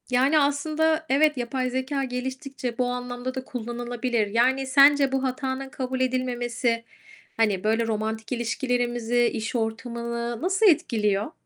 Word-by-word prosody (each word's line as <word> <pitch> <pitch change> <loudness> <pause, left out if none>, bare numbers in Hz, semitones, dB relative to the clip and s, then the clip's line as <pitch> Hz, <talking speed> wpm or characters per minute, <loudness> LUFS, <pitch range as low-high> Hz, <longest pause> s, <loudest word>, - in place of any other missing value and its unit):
Yani 265 +5 +4
aslında 310 +3 +1
evet, 295 +2 +3
yapay 255 +1 -2
zekâ 260 +2 -2
geliştikçe 260 -1 -4
bu 250 - +1
anlamda 245 +1 -4
da 260 - -4
kullanılabilir. 240 -1 -2
Yani, 255 +5 +2
sence 275 0 +5
bu 270 0 0
hatanın 265 0 -3
kabul 260 -1 -4
edilmemesi, 245 -2 -1 0.5
hani, 210 -5 +1
böyle 225 +2 +1
romantik 220 0 -3
ilişkilerimizi, 240 0 0
iş 225 0 -2
ortamını 235 0 -3
nasıl 380 +4 +2
etkiliyor? 215 - +2
250 Hz, 125 wpm, -25 LUFS, 235-265 Hz, 0.5 s, sence